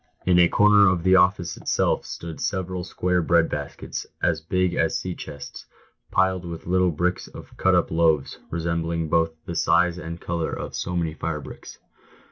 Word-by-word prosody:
In 90 -1 +4
a 85 - +7
corner 105 +2 +5
of 90 -3 0
the 95 +1 +5
office 90 -3 +3
itself - - 0
stood 85 -2 -7
several]square 90 -1 -1
bread 85 -1 +3
baskets, 75 -1 -5
as 80 -2 0
big 90 +2 0
as - - +1
sea 90 - -4
chests, 70 -4 -9 0.4
piled 95 -1 +1
with 85 -2 -7
little 90 +1 +2
blocks 90 +3 -1
of - - -12
cut - - +3
up - - +1
loaves, 80 -4 +1
resembling 85 -1 -2
both 80 0 +1
in 85 - -4
size 90 +1 +2
and 85 0 -7
colour 85 -2 -3
so 90 - -4
many 85 -2 -1
fire 80 -1 -3
bricks. - - -11
85 Hz, 165 wpm, -24 LUFS, 80-90 Hz, 0.4 s, a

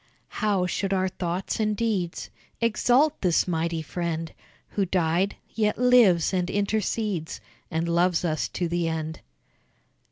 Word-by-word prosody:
How 200 -4 +2
should 195 +2 -1
our 190 0 +1
thoughts 180 +2 -3
and 210 -1 0
deeds 200 -7 -2 0.3
Exalt 245 +6 +2
this 180 -2 +2
mighty 165 -1 -1
friend, 165 0 -3 0.4
Who 200 - 0
died, 180 +1 +1 0.2
yet 210 -1 +1
lives 235 -10 +5
and 180 -1 0
intercedes 205 -3 -1 0.3
And 160 +1 -1
loves 175 +1 +2
us 155 -2 0
to 175 - -2
the 170 0 -1
end! 160 0 -3
180 Hz, 130 wpm, -26 LUFS, 170-210 Hz, 0.4 s, lives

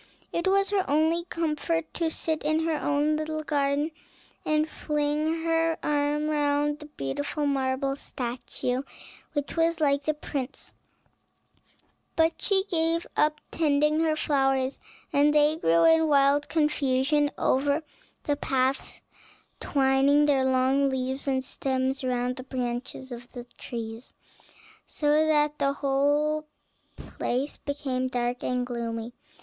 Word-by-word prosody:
It 340 +2 0
was 395 +1 +2
her 395 -2 +2
only 320 +4 +2
comfort 330 -1 -2
to 330 -2 0
sit 320 0 -2
in 310 +2 +1
her 325 -1 +1
own 295 +1 +1
little 310 0 -3
garden, 290 +1 0 0.5
and 305 0 +1
fling 300 +2 -1
her 330 0 +1
arm 295 +1 +1
round 295 0 +1
the 300 - -10
beautiful 285 - -3
marble 270 0 0
statue 250 -1 -4 0.5
which 290 -2 -3
was 330 0 +2
like 280 -2 +2
the 310 - +1
prince; 280 -2 -6 1.4
but 325 0 +3
she 390 -2 +2
gave 330 -2 0
up 300 0 +2
tending 300 -1 +2
her 320 -1 +2
flowers, 270 -3 +1 0.3
and 295 +1 +4
they 300 +1 +4
grew 165 - +3
in 325 0 +5
wild 285 0 +3
confusion 295 -2 +2
over 285 +4 +1 0.4
the 290 - 0
paths, 265 -1 -1 0.6
twining 275 +1 +3
their 275 -3 +3
long 265 +2 +3
leaves 265 +1 -3
and 260 -1 0
stems 265 0 -1
round 250 0 -1
the 255 - -6
branches 255 0 -4
of 240 0 -9
the 245 -2 -7 0.2
trees, 230 0 -7 0.7
so 300 +1 +2
that 300 -1 +2
the 275 -1 +2
whole 290 +2 +1 0.5
place 265 +4 -3
became 270 -3 -2
dark 245 -1 -2
and 250 0 0
gloomy. 235 -1 -4
290 Hz, 130 wpm, -27 LUFS, 265-310 Hz, 1.4 s, in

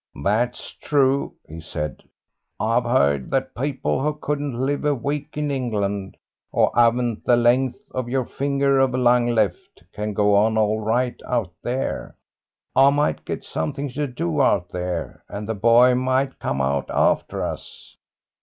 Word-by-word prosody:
"That's 120 +6 0
true," 140 -1 +1
he 80 +1 -9
said. 75 -3 -5 0.6
"I've - - +1
heard 70 -2 +2
that 135 0 -1
people 135 0 -1
who 150 +2 0
couldn't 145 -4 -3
live 140 +2 -1
a 145 -1 +2
week 145 +3 -4
in 150 -1 -1
England, 100 -7 -2 0.3
who - - +3
haven't 120 -1 +2
the 120 - +4
length 125 +2 +2
of 130 -2 -3
your 130 0 0
finger 140 0 +1
of 130 -2 +2
lung 120 -1 +3
left, 110 -9 -1
can 105 0 -3
go 105 0 +3
on 110 +2 +3
all 110 0 +2
right 120 +3 -1
out 110 -8 -1
there. 130 +2 -3 0.6
I 135 +1 +7
might 145 +1 0
get - - -4
something 145 0 -3
to 145 +3 -2
do 150 +3 -1
out 100 -9 +2
there, 90 -2 -4
and 100 +1 -6
the 110 - -1
boy 115 +4 +5
might 130 +2 0
come 65 0 -2
out 70 +1 -1
after - - +1
us." - - -8
125 Hz, 155 wpm, -22 LUFS, 105-135 Hz, 0.6 s, I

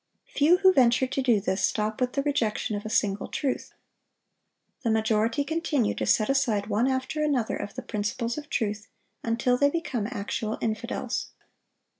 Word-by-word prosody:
Few 315 +5 +5
who 375 0 +5
venture 250 -2 +4
to 265 +1 -2
do 240 -5 +3
this 190 -1 -1
stop 215 +2 0
with 250 0 +1
the 275 - 0
rejection 225 -7 0
of 205 +1 -5
a - - -5
single 205 -2 0
truth. 270 -3 -3 1.1
The 240 - 0
majority 220 +4 +1
continue 295 -6 0
to - - -3
set 215 - +3
aside 245 -7 +1
one 215 +4 +1
after 265 +4 -1
another 270 -7 0
of 205 - -6
the - - -5
principles 215 +3 -2
of 295 -1 -7
truth, 210 -2 -2 0.4
until 235 +2 +1
they 285 +2 +4
become 270 -9 -2
actual 215 -1 -3
infidels. 220 -1 -3
235 Hz, 165 wpm, -27 LUFS, 215-275 Hz, 1.1 s, Few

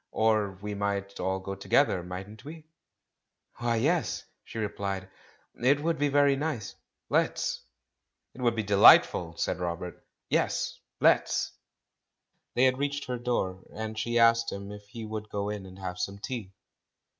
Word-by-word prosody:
Or 110 -3 +2
we 105 0 -3
might 100 -1 -2
all 95 0 0
go 95 +1 -5
together, 95 +1 +2
mightn't 95 +5 -8
we 155 +2 -10 0.4
?" - - -41
"Why, 120 -1 +1
yes," 155 +9 +1 0.2
she - - -10
replied, 100 -3 -3 0.6
"it 140 +3 +5
would 165 -1 0
be 145 0 +2
very 140 0 +4
nice. 135 -8 -3 0.3
Let's!" - - 0 0.7
"It 125 - -10
would 120 -2 +2
be 110 - -1
delightful 100 -4 +6
I" - - -24
said - - 0
Robert 90 0 -4 0.2
"Yes, - - 0 0.2
let's - - +3
1" - - -34 1.0
They 125 - +4
had 130 0 +4
reached 145 0 -1
her 125 -1 -3
door, 95 -6 -1
and 110 0 -4
she 120 +2 -1
asked 115 0 +5
him 100 0 -6
if 105 0 -10
he 115 +1 -7
would 110 0 -5
go 100 0 -2
in 105 -2 -5
and 95 0 -12
have 90 -1 -5
some 100 0 -3
tea. 110 -2 -5
110 Hz, 165 wpm, -29 LUFS, 100-125 Hz, 1.0 s, delightful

